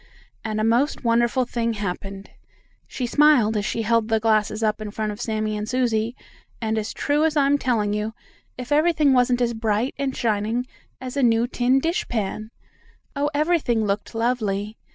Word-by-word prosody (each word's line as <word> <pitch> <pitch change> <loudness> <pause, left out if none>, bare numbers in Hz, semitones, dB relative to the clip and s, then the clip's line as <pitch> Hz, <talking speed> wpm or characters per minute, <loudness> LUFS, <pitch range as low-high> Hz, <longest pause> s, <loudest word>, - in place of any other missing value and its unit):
And 215 -1 -2
a - - 0
most 240 +7 +1
wonderful 235 +2 +2
thing 230 -1 -1
happened, 195 -1 -5 0.6
she 255 - -4
smiled 250 -5 +4
as 210 -1 -1
she 230 0 -2
held 230 0 +2
the 225 -1 +2
glasses 215 0 +1
up 215 0 0
in 215 - -4
front 215 0 -3
of 210 +3 -8
Sammie 215 -2 -2
and 210 +1 -4
Susie, 235 -2 0 0.4
and 220 -1 -1
as 215 - -4
true 295 +2 0
as 320 -1 +1
I'm 285 0 +3
telling 220 -6 0
you, 210 +1 -3 0.4
if 250 +1 -7
everything 305 -2 +3
wasn't 250 -1 +3
as 235 -1 +1
bright 220 +2 -1
and 275 -2 -2
shining 225 +1 0 0.3
as 255 +1 -7
a 280 - +1
new 230 -1 +3
tin 250 +1 +2
dishpan. 220 - -2 0.7
Oh, 285 +1 0
everything 295 -8 +1
looked 205 +3 -3
lovely! 215 -3 -1
230 Hz, 175 wpm, -23 LUFS, 215-255 Hz, 0.7 s, smiled